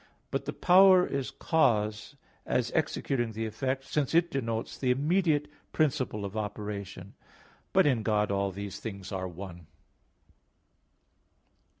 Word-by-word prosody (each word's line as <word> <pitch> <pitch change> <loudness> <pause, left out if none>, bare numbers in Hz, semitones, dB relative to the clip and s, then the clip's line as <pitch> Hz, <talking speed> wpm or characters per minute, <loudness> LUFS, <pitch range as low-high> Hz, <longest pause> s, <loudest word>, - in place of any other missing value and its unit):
But - - -2
the - - -3
power 185 0 +6
is 135 -2 -3
cause, 110 -5 0 0.3
as - - 0
executing 120 -4 -1
the 110 +1 -3
effect, 130 +4 -2
since 145 +2 -1
it 170 0 +3
denotes 115 -4 -3
the 130 - -1
immediate 150 +2 +2 0.3
principle 135 -9 0
of 100 +1 -7
operation. 105 -2 -5 0.6
But - - +4
in 130 -6 +2
God 105 -1 +1
all 100 0 0
these 100 +1 -6
things 100 -3 -7
are 95 -1 -3
one. 90 -2 -9
115 Hz, 125 wpm, -29 LUFS, 100-145 Hz, 0.6 s, power